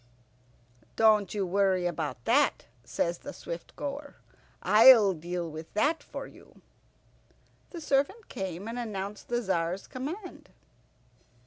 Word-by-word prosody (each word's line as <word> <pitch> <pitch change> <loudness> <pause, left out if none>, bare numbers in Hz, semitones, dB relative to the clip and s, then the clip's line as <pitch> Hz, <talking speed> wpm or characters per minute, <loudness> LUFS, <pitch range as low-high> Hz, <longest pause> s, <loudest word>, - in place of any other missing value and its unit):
"Don't 215 -3 +4
you 200 -2 0
worry 190 -1 +1
about 150 -8 -3
that," - - +2 0.2
says 170 0 -2
the 285 - -8
Swift - - -8
goer, 285 0 -6 0.5
"I'll 220 -3 +7
deal 175 +1 -4
with 160 0 -9
that 300 +9 +2
for - - -7
you." - - -17 1.1
The 340 - -8
servant 300 +10 0
came 190 +1 -5
and 235 +2 -4
announced 205 -3 -5
the 240 0 -1
Tzar's 185 -2 -1
command. 330 +10 -7
205 Hz, 120 wpm, -29 LUFS, 175-270 Hz, 1.1 s, I'll